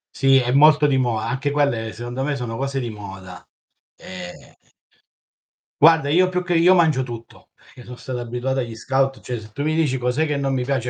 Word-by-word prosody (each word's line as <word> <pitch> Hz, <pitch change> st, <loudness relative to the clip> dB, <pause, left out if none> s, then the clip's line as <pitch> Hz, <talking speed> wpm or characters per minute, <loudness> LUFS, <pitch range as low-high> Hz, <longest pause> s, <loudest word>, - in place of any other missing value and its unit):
Sì, 135 Hz, -1 st, +4 dB
è 125 Hz, -2 st, +1 dB
molto 150 Hz, +2 st, +5 dB
di 135 Hz, -2 st, +1 dB
moda. 120 Hz, -4 st, -1 dB
Anche 140 Hz, +1 st, -2 dB
quelle 120 Hz, -7 st, -1 dB
secondo 120 Hz, +3 st, -5 dB
me 145 Hz, 0 st, -1 dB
sono 115 Hz, -3 st, -5 dB
cose 135 Hz, 0 st, -3 dB
di 120 Hz, -3 st, -4 dB
moda. 95 Hz, -3 st, -10 dB, 0.5 s
E 90 Hz, -1 st, -11 dB, 1.3 s
Guarda, 160 Hz, -2 st, +5 dB
io 180 Hz, +5 st, +4 dB
più 180 Hz, 0 st, -2 dB
che 175 Hz, -1 st, -1 dB
io 175 Hz, +3 st, +5 dB
mangio 155 Hz, -7 st, +2 dB
tutto, 115 Hz, -2 st, -11 dB
perché 125 Hz, -, -17 dB
son 125 Hz, -, -8 dB
stato 125 Hz, -1 st, -6 dB
abituato 125 Hz, +3 st, -3 dB
agli 115 Hz, -3 st, -4 dB
scout 135 Hz, +3 st, -1 dB
cioè 125 Hz, -2 st, -5 dB
se 110 Hz, 0 st, -14 dB
tu 140 Hz, -, -4 dB
mi 155 Hz, +1 st, 0 dB
dici: 150 Hz, -5 st, +1 dB
"Cos'è 125 Hz, +5 st, 0 dB
che 150 Hz, -2 st, -2 dB
non 135 Hz, -1 st, -1 dB
mi 125 Hz, -1 st, -1 dB
piace", 130 Hz, -2 st, -2 dB
130 Hz, 205 wpm, -21 LUFS, 120-145 Hz, 1.3 s, molto